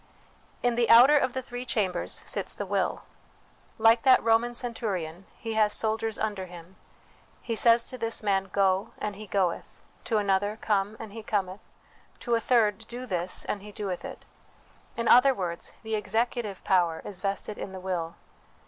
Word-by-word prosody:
In 245 -1 +3
the 235 0 +1
outer 245 +6 +8
of 260 -4 +2
the 260 - -3
three 245 0 -6
chambers 195 -7 -1
sits - - -2
the - - -4
Will. - - -1 0.7
Like 225 0 +5
that 260 0 +5
Roman 230 +2 +2
centurion, 195 -8 -3
he 225 -1 -5
has 215 -1 +3
soldiers 220 0 -1
under 205 -4 -3
him: 175 +1 -12 0.6
he 230 - -4
says 230 +1 +5
to 255 - -8
this 230 -1 -2
man, 195 -2 +1
Go, 195 0 +1
and 210 -1 -4
he 215 +1 -9
goeth; 185 -3 -1 0.3
to 225 - +1
another, 205 +1 +1
Come, 205 0 0
and 220 -3 -8
he 225 - -7
cometh; 195 -3 -2 0.6
to 240 - -1
a 230 - +4
third, 220 -4 +2
Do 245 +1 -7
this, 180 -5 -1
and 200 - -3
he 210 +1 -10
doeth 200 -4 -4
it. - - -9 0.7
In 230 0 -1
other 260 +2 +6
words, 175 -4 -4
the 220 0 -4
executive 215 0 -1
power 175 -4 +1
is 195 -3 -7
vested 200 +1 -3
in 195 - -5
the 190 - -7
will. 175 -3 -3
210 Hz, 175 wpm, -27 LUFS, 190-230 Hz, 0.7 s, outer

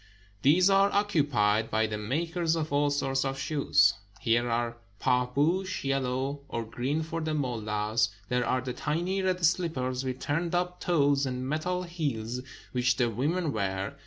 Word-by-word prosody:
These 170 - +5
are 195 0 +4
occupied 140 - +2
by 110 +1 +2
the 105 -1 -3
makers 165 - -1
of 155 -3 -2
all 145 0 +3
sorts 135 -2 0
of 135 0 -2
shoes. 120 -10 +3 0.3
Here 120 +1 +1
are 120 0 -1 0.2
paJibousk, 145 +9 +1
yellow, 135 +1 -1
or 115 - -2
green 130 +7 -2
for 165 +1 -4
the 155 -1 -1
mullahs; 110 -4 0 0.2
there 125 +1 +1
are 130 - 0
the 125 0 -4
tiny 175 +8 -1
red 185 -2 +1
slippers 135 -7 0
with 130 -1 -3
turned 165 +6 -1
up 180 0 -1
toes 140 -5 +2
and 130 0 -3
metal 180 +5 -1
heels 130 -9 -3 0.3
which 125 -1 +2
the 120 -3 +1
women 150 - 0
wear. 95 -2 -2
135 Hz, 160 wpm, -29 LUFS, 120-165 Hz, 0.3 s, These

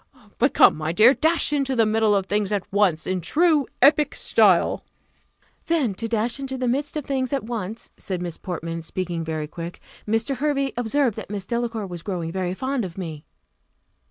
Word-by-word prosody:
But 260 +4 +2
come, - - +7
my 155 +1 -2
dear, 220 +9 +6
dash 320 0 +1
into 275 -2 0
the 225 -2 +4
middle 215 -1 +2
of 195 -1 +1
things 205 0 -1
at 205 -3 -1
once, 190 -6 +2
in 185 0 -1
the 170 - -10
true 315 - +3 0.2
Epic 295 +1 +5
style." - - +3 0.8
"Then 300 -11 +1
to 230 +4 -4
dash 230 +3 0
into 265 -1 -4
the 255 -1 -1
midst 280 +5 -1
of 295 - -4
things 260 -2 -1
at 275 - -1
once," 220 -1 -5
said 185 -2 -4
Miss 175 -2 -5
Portman, 165 -2 -5
speaking 170 0 -4
very 155 -1 -3
quick: 170 +2 -7 0.3
"Mr. 225 +5 0
Hervey 275 -1 0
observed 245 0 0
that - - -7
Miss 200 -2 -5
Delacour 235 -1 -2
was 175 -3 -7
growing 170 -3 -4
very 185 0 -2
fond 260 +2 -2
of 180 -2 -7
me." 160 -5 -6
220 Hz, 190 wpm, -23 LUFS, 180-265 Hz, 0.8 s, come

